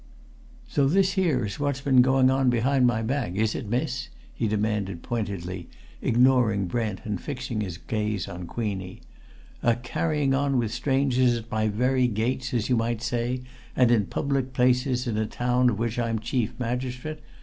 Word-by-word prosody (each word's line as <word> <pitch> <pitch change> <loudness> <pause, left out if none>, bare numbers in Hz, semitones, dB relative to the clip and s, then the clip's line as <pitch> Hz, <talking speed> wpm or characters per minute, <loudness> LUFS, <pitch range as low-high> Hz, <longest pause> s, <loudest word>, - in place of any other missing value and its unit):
"So 140 -2 +2
this 190 +5 +3
here 160 - +1
is 100 +5 -5
what's 140 -2 -1
been 130 -2 +5
going 130 0 +4
on 135 -1 +3
behind 125 +2 +3
my 115 -2 +1
back, 120 -6 -1
is 110 +2 +1
it, 105 - -5
miss?" 125 +1 -2 0.2
he 115 - -1
demanded, 105 -4 -1
pointedly 95 -6 -4 0.3
ignoring 120 -5 +3
Brent 110 0 -2
and 105 -4 -3
fixing 125 -5 -4
his 90 -5 -4
gaze 105 0 -2
on 90 0 -7
Queenie. 95 -5 -4 0.6
"A 120 -1 +3
carrying 140 +3 0
on 140 0 +1
with 115 -3 0
strangers 130 -1 +2
at 115 0 -9
my 110 0 +1
very 125 +4 +2
gates, 120 +3 -1
as 120 -3 0
you 125 - +2
might 115 0 -1
say, 120 +2 -1 0.3
and 125 -2 +4
in 105 -5 +3
public 135 -2 -1
places 125 0 +2
in 115 -4 -2
a 110 - 0
town 125 +2 +2
of 105 - -1
which 115 +2 -2
I'm 115 -1 0
chief 115 +1 -2
magistrate! 125 +5 -3
120 Hz, 170 wpm, -26 LUFS, 110-130 Hz, 0.6 s, been